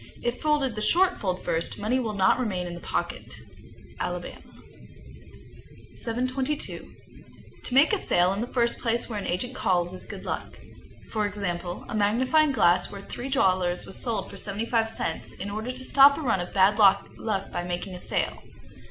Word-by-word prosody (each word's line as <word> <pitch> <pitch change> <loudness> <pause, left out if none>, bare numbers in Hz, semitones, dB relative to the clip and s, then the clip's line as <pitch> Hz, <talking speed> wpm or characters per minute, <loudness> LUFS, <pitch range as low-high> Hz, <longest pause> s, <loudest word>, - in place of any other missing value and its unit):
If 240 +1 -2
folded 295 -5 +1
the 215 - -5
short 365 - +3
fold 185 -3 -2
first, 165 +1 0
money 230 +5 0
will 220 -4 -2
not 190 +4 +3
remain 190 -8 -1
in 175 - -5
the 175 - -7
pocket. - - -4 0.6
Alabama. - - -4 1.5
722. 255 +5 -3 0.7
To - - -5
make 285 +9 +6
a 415 - +2
sale 180 - +2
in 200 - -3
the 240 - -2
first 235 -2 0
place 235 0 +1
where 215 -3 -3
an - - -5
agent 215 +9 -2
calls 175 -4 0
is 185 - -8
good - - -8
luck. - - -5 0.5
For 215 -2 0
example, 180 -4 -4
a - - -7
magnifying 255 +9 +3
glass 185 -8 +3
worth 200 -1 -10
three 255 +3 -5
dollars 185 -9 +2
was - - -3
sold 230 -3 -2
for - - -9
seventy 205 +2 -3
five 225 -1 +1
cents, 165 -7 -3
in 200 +2 -6
order 215 +4 -4
to 255 +1 -3
stop 280 +1 +7
a - - -4
run 230 -9 +1
of 175 - -5
bad 200 +2 +4
luck 200 -1 +5 0.4
by 175 - -3
making 180 +2 -4
a 180 - -7
sale. - - -2
215 Hz, 180 wpm, -26 LUFS, 185-255 Hz, 1.5 s, stop